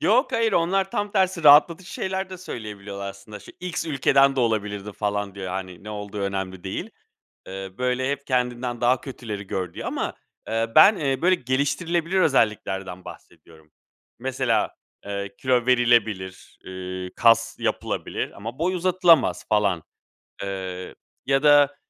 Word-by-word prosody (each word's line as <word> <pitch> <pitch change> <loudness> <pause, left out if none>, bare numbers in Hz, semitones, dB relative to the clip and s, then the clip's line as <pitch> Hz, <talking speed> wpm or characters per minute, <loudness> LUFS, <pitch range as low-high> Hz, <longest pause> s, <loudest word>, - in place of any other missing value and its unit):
Yok, 255 +5 +3
hayır. 230 -3 +1
Onlar 190 +3 +1
tam 205 0 -2
tersi 185 -4 +1
rahatlatıcı 160 +5 +6
şeyler 190 0 -3
de 185 - -7
söyleyebiliyorlar 105 - -7
aslında: 100 +2 -11
"Şu - - -13
X 180 -2 -3
ülkeden 135 -2 +3
de 130 - +2
olabilirdin." 105 -3 -1
falan, 105 -1 -2
diyor. 95 -2 -6
Hani, 95 0 -6
ne 105 - -7
olduğu 105 0 -6
önemli 95 -2 -3
değil. 95 - -4 0.6
Eee, 95 0 -6
böyle: 125 +1 0
"Hep 140 0 -4
kendinden 125 -1 -1
daha 125 +1 +3
kötüleri 110 -7 -7
gör." 90 -3 -4
diyor - - -6
ama, - - -3 0.3
eee, 115 +1 0
ben, 205 +1 +8
eee, 135 -2 -1
böyle, 185 +2 +5
geliştirilebilir 165 +6 0
özelliklerden 95 - 0
bahsediyorum. 80 -2 -14 0.5
Mesela, - - 0 0.3
eee, 100 0 -4
kilo 125 -2 +1
verilebilir, 115 -7 +1
ııı, 95 0 -6
kas 115 0 +4
yapılabilir - - -2
ama 115 +6 -7
boy 180 +3 0
uzatılamaz 175 -4 +3
falan, 100 -6 +2 0.6
eee, 95 -2 -5 0.3
ya 135 +1 +2
da 145 -1 +6
120 Hz, 140 wpm, -24 LUFS, 100-150 Hz, 0.6 s, ben